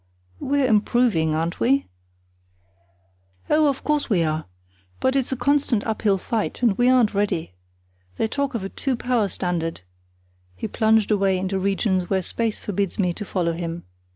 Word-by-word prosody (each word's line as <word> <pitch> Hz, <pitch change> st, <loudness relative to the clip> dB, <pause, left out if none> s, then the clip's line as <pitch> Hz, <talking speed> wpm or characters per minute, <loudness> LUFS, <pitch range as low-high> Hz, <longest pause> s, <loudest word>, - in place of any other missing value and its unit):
"We're 280 Hz, 0 st, +1 dB
improving, 215 Hz, -8 st, +2 dB
aren't 165 Hz, +2 st, -2 dB
we?" 135 Hz, +4 st, +2 dB, 1.7 s
"Oh, 305 Hz, 0 st, +4 dB
of 275 Hz, -, -3 dB
course, 300 Hz, -2 st, 0 dB
we 185 Hz, -6 st, +3 dB
are! 155 Hz, 0 st, -1 dB, 0.5 s
But 260 Hz, +1 st, +1 dB
it's 270 Hz, -2 st, 0 dB
a -, -, +1 dB
constant 280 Hz, -6 st, +1 dB
uphill 215 Hz, -3 st, +1 dB
fight; 225 Hz, +5 st, -3 dB
and 225 Hz, -5 st, +4 dB
we 245 Hz, +3 st, +3 dB
aren't 250 Hz, -5 st, +4 dB
ready. 195 Hz, -, -1 dB, 0.6 s
They -, -, +1 dB
talk 280 Hz, +2 st, -2 dB
of 220 Hz, -, -2 dB
a 195 Hz, -, -4 dB
two 265 Hz, +4 st, -2 dB
power 240 Hz, -3 st, 0 dB
standard——" 175 Hz, -, -3 dB, 0.7 s
He 90 Hz, -, -4 dB
plunged 220 Hz, -1 st, +2 dB
away 195 Hz, -2 st, +2 dB
into 190 Hz, +1 st, -2 dB
regions 190 Hz, -1 st, 0 dB
where 190 Hz, -1 st, +1 dB
space 225 Hz, +3 st, -2 dB
forbids 200 Hz, -2 st, -2 dB
me 180 Hz, -3 st, +1 dB
to 210 Hz, -, -6 dB
follow 175 Hz, -4 st, -1 dB
him. 170 Hz, 0 st, -5 dB
205 Hz, 160 wpm, -23 LUFS, 180-245 Hz, 1.7 s, Oh